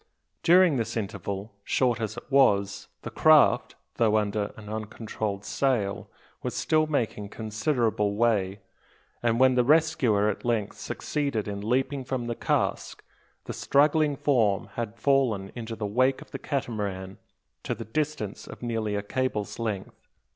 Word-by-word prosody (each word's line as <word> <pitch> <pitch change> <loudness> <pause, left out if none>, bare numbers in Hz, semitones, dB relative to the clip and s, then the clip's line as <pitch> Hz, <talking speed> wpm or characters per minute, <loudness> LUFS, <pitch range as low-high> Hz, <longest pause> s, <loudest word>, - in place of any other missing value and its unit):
During 175 -4 +5
this 115 0 -2
interval 100 0 -4
short 120 -1 +1
as 110 +1 -3
it - - -6
was 100 -8 +3 0.2
the - - -6
craft, 155 -2 +5 0.2
though 110 -2 +3
under 105 -1 -1
an 105 -1 -11
uncontrolled 110 -1 -4
sail, 120 -8 0 0.3
was - - -4
still 155 0 +2
making 115 -8 -2
considerable 110 -1 0
way; 105 -4 +1 0.6
and 115 -1 +1
when 130 0 +6
the 125 0 +3
rescuer 140 -8 +3
at 105 - -2
length 115 -4 -1
succeeded 140 -8 -2
in 100 -1 -4
leaping 130 +5 0
from 125 -1 -3
the 120 - -2
cask, - - -1 0.4
the - - -5
struggling 150 +1 +3
form 115 -8 +1
had 115 -1 -4
fallen 115 -6 +1
into 115 -1 -6
the 110 - -4
wake 130 +6 +2
of - - -25
the - - -5
Catamaran 100 -8 -3 0.4
to - - -3
the - - -7
distance 140 -4 -3
of - - -10
nearly 110 -3 -1
a 100 - -2
cable's 120 -2 -2
length. 105 -4 -5
115 Hz, 145 wpm, -27 LUFS, 105-130 Hz, 0.6 s, when